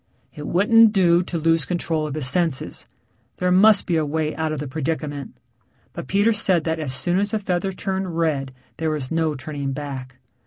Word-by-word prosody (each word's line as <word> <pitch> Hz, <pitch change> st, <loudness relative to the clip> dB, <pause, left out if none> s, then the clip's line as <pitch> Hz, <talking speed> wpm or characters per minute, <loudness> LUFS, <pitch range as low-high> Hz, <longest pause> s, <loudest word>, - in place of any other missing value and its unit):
It 150 Hz, -1 st, -7 dB
wouldn't 220 Hz, +4 st, +5 dB
do 175 Hz, -3 st, +4 dB
to 180 Hz, -1 st, -4 dB
lose 165 Hz, 0 st, +2 dB
control 165 Hz, -2 st, -2 dB
of 150 Hz, -, -5 dB
his 155 Hz, -4 st, -2 dB
senses. 155 Hz, +1 st, -1 dB, 0.5 s
There 180 Hz, 0 st, 0 dB
must 200 Hz, +3 st, +5 dB
be 170 Hz, -3 st, +1 dB
a 160 Hz, -, +1 dB
way 155 Hz, +1 st, -2 dB
out 160 Hz, -1 st, -2 dB
of 155 Hz, -, -3 dB
the 150 Hz, -, -4 dB
predicament. 145 Hz, -1 st, -4 dB, 0.6 s
But -, -, -7 dB
Peter 205 Hz, +3 st, +3 dB
said 190 Hz, -6 st, +2 dB
that 160 Hz, 0 st, -2 dB
as 150 Hz, -4 st, -3 dB
soon 175 Hz, +6 st, +1 dB
as 205 Hz, +1 st, 0 dB
the 220 Hz, -, -1 dB
feather 190 Hz, -2 st, -1 dB
turned 190 Hz, -2 st, -3 dB
red 145 Hz, -5 st, 0 dB, 0.3 s
there 160 Hz, -1 st, -1 dB
was 150 Hz, -4 st, -3 dB
no 160 Hz, -2 st, 0 dB
turning 140 Hz, 0 st, -4 dB
back. 135 Hz, -3 st, -7 dB
160 Hz, 195 wpm, -22 LUFS, 150-180 Hz, 0.6 s, wouldn't